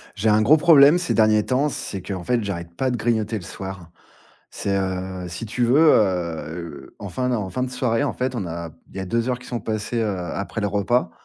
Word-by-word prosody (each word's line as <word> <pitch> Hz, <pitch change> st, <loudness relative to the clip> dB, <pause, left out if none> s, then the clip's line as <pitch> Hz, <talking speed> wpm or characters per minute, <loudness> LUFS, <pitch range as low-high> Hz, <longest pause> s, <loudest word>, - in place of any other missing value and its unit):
J'ai 110 Hz, +2 st, +1 dB
un 105 Hz, +1 st, +4 dB
gros 150 Hz, +8 st, +6 dB
problème 150 Hz, 0 st, +7 dB
ces 180 Hz, -, -1 dB
derniers 110 Hz, -1 st, +4 dB
temps, 135 Hz, +5 st, +1 dB
c'est 100 Hz, -7 st, -4 dB
qu'en 95 Hz, -1 st, -5 dB
fait, 120 Hz, +2 st, 0 dB
j'arrête 85 Hz, -4 st, -5 dB
pas 130 Hz, +4 st, 0 dB
de 125 Hz, -, -1 dB
grignoter 110 Hz, -1 st, 0 dB
le -, -, -7 dB
soir. 95 Hz, -1 st, -8 dB, 0.6 s
C'est, 100 Hz, -, -2 dB
heu, 95 Hz, -1 st, -3 dB
si 85 Hz, +6 st, -6 dB
tu 120 Hz, +3 st, -2 dB
veux, 125 Hz, +5 st, +4 dB
heu 85 Hz, -5 st, -2 dB
enfin, 115 Hz, +6 st, -3 dB
non: 125 Hz, -, +1 dB
en 100 Hz, -3 st, -3 dB
fin 125 Hz, -, -3 dB
de 130 Hz, -, -1 dB
soirée, 125 Hz, -3 st, 0 dB
en -, -, -1 dB
fait, 130 Hz, 0 st, -2 dB
on 100 Hz, -6 st, -3 dB
a 85 Hz, 0 st, -6 dB, 0.2 s
il -, -, -19 dB
y -, -, -2 dB
a 95 Hz, -, -3 dB
2 115 Hz, +6 st, -1 dB
heures 125 Hz, -, 0 dB
qui 125 Hz, 0 st, -14 dB
sont 120 Hz, -, -3 dB
passées, 110 Hz, +2 st, -3 dB
heu, 105 Hz, -4 st, -1 dB, 0.2 s
après 100 Hz, +2 st, -4 dB
le 105 Hz, -, +1 dB
repas, 105 Hz, +5 st, +1 dB
105 Hz, 235 wpm, -22 LUFS, 95-125 Hz, 0.6 s, problème